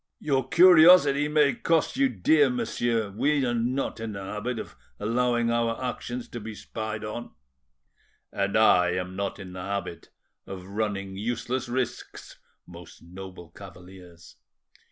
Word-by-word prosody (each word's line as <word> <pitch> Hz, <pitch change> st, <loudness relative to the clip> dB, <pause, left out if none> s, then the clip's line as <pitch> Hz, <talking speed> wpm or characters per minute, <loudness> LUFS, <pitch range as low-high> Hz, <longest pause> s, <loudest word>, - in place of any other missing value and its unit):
"Your 135 Hz, -3 st, -1 dB
curiosity 170 Hz, -5 st, +7 dB
may 150 Hz, -2 st, +3 dB
cost 165 Hz, -2 st, 0 dB
you 275 Hz, 0 st, +2 dB
dear, 150 Hz, -, +3 dB
monsieur; 120 Hz, -3 st, -1 dB
we 140 Hz, +7 st, +1 dB
are 120 Hz, -, 0 dB
not 120 Hz, +1 st, -2 dB
in 110 Hz, -1 st, -5 dB
the 100 Hz, -1 st, -6 dB
habit 105 Hz, +5 st, -4 dB
of -, -, -8 dB, 0.2 s
allowing 120 Hz, +2 st, 0 dB
our 115 Hz, -1 st, 0 dB
actions 125 Hz, -1 st, -5 dB
to 120 Hz, -, -7 dB
be 110 Hz, 0 st, -8 dB
spied 110 Hz, 0 st, -6 dB
on." 120 Hz, +3 st, -7 dB, 1.0 s
"And 100 Hz, 0 st, -1 dB
I 90 Hz, -5 st, +4 dB
am 90 Hz, 0 st, -4 dB
not 100 Hz, 0 st, -3 dB
in 95 Hz, -2 st, -10 dB
the 90 Hz, -, -7 dB
habit 95 Hz, -3 st, -5 dB, 0.4 s
of 95 Hz, -1 st, -8 dB
running 100 Hz, -1 st, -3 dB
useless 120 Hz, +4 st, -3 dB
risks, 125 Hz, 0 st, -5 dB, 0.3 s
most -, -, -13 dB
noble 90 Hz, -1 st, -11 dB
cavaliers. 90 Hz, -3 st, -14 dB
115 Hz, 140 wpm, -26 LUFS, 95-130 Hz, 1.0 s, curiosity